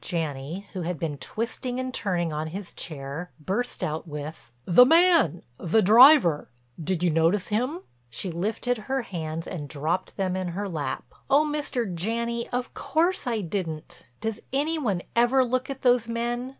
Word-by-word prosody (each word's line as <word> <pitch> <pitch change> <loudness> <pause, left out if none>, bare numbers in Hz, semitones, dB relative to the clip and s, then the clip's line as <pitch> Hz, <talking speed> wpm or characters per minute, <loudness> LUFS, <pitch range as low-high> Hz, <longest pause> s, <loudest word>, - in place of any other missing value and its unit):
Janney, 160 +2 -3
who 185 - -3
had 175 0 -2
been 145 -2 -3
twisting 245 - -3
and 255 0 -3
turning 175 -8 -1
on 155 +1 -2
his 185 +3 -7
chair, 150 +2 -6
burst 205 +11 -2
out 155 +3 -3
with: 150 -5 -7
"The 185 +8 +8
man—the 250 - +3
driver—did 175 - +4
you 175 - +3
notice 165 +5 +2
him?" 250 - -1 0.3
She 145 +10 -3
lifted 220 +7 -1
her 265 -1 0
hands 165 -5 -5
and 150 -6 -6
dropped 160 +6 -2
them 185 -2 0
in 185 -1 -2
her 205 0 -2
lap. 160 -6 -4 0.2
"Oh, 285 +3 +5
Mr. 295 -5 -1
Janney, 235 +6 -2
of 250 0 -3
course 320 +4 0
I 230 -3 0
didn't. 165 -4 -5
Does 220 -1 -2
any 305 +4 0
one 200 -11 -1
ever 245 +3 +4
look 255 +2 -1
at 270 -1 -5
those 245 -2 +3
men? 240 +2 -2
195 Hz, 160 wpm, -26 LUFS, 165-245 Hz, 0.3 s, The